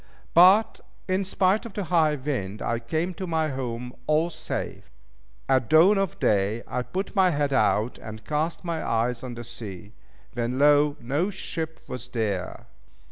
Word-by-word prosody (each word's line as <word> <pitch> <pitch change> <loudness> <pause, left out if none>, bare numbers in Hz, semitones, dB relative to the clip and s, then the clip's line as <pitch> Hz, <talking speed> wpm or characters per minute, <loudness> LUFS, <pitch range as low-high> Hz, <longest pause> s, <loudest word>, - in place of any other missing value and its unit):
But 190 +6 +6 0.3
in 185 +1 +1
spite 190 +2 +1
of 230 - -9
the 205 - -2
high 160 -3 +2
wind, 130 -8 -3
I 115 0 -1
came 160 +10 -2
to 185 +2 -6
my 160 -2 0
home 125 -2 -4
all 155 +3 +2
safe. - - -5 0.6
At 130 -4 +2
dawn 180 +6 +6
of 195 -4 -1
day 105 +3 +1
I 125 - -2
put 190 +11 -4
my 190 -2 +5
head 145 -3 0
out, 115 -3 +1
and 110 -1 -9
cast 155 +2 -2
my 165 -2 -2
eyes 115 +1 0
on 125 -2 -6
the 120 - -7
sea. 105 -4 -9 0.4
When 120 +1 -2
lo! 145 +1 +4
no 145 +11 0
ship 160 -4 -5
was 125 -1 -6
there! 105 -7 -3
145 Hz, 165 wpm, -25 LUFS, 120-170 Hz, 0.6 s, But